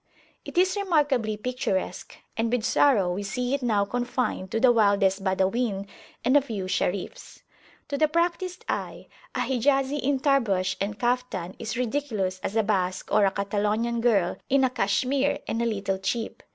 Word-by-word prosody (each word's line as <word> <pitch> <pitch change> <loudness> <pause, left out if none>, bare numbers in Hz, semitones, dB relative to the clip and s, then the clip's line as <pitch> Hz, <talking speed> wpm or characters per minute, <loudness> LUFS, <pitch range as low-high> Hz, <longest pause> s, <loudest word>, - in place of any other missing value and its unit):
It - - -8
is 370 +2 +4
remarkably 290 - +1
picturesque, 230 -4 -3 0.2
and 225 0 0
with 245 -2 0
sorrow 230 -7 +3
we 195 - -3
see 245 +6 -2
it 280 - 0
now 215 -5 +2
confined 245 -4 -2
to 225 - -1
the 255 +1 +6
wildest 200 -3 +3
Badawin 195 +2 0 0.4
and 255 +3 +4
a 290 - +7
few 220 -8 -5
Sharifs. 200 - -3 0.5
To 280 -1 -2
the 310 - +5
practised 345 +3 -1
eye, - - -4 0.3
a 255 - 0
Hijazi 270 +3 +1
in 275 0 0
Tarbush 205 -10 +1
and 205 +1 -2
Caftan 240 -7 -1
is 220 +2 -4
ridiculous 225 -7 -1
as 200 - -4
a 225 - +3
Basque 185 -3 -1
or 210 -1 +5
a 195 - +2
Catalonian 210 +4 -1
girl 205 -7 +2
in 270 0 +4
a 260 - +2
cachemire 260 +6 +1
and 230 - -1
a - - +1
little 200 -3 -2
chip. 225 +4 -3
230 Hz, 165 wpm, -26 LUFS, 200-265 Hz, 0.5 s, a